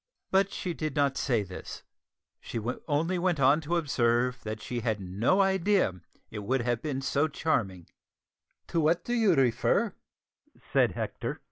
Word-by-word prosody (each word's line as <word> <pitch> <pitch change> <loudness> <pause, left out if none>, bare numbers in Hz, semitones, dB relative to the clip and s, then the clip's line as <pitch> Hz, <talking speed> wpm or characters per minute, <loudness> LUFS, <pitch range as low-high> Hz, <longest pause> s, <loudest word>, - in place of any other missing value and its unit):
But 195 +1 +3
she 180 -3 -3
did 155 -3 -4
not 140 -2 +2
say 120 -7 +1
this; 95 -2 -9 0.6
she 115 - -5 0.3
only 165 +4 0
went 175 -3 +1
on 140 +4 +4
to 165 +3 -2
observe 125 -5 +1
that 110 0 -5
she 120 +3 -4
had 110 -2 -1
no 100 - +1
idea 190 - +1 0.3
it 110 - -5
would 125 +6 0
have 120 -1 -1
been 140 -3 -3
so 145 +3 +1
charming. 110 - -1 0.8
"To 170 - 0
what 165 +3 +2
do 240 - -2
you 220 -7 +4
refer?" 125 -4 +2
140 Hz, 145 wpm, -29 LUFS, 115-170 Hz, 0.8 s, on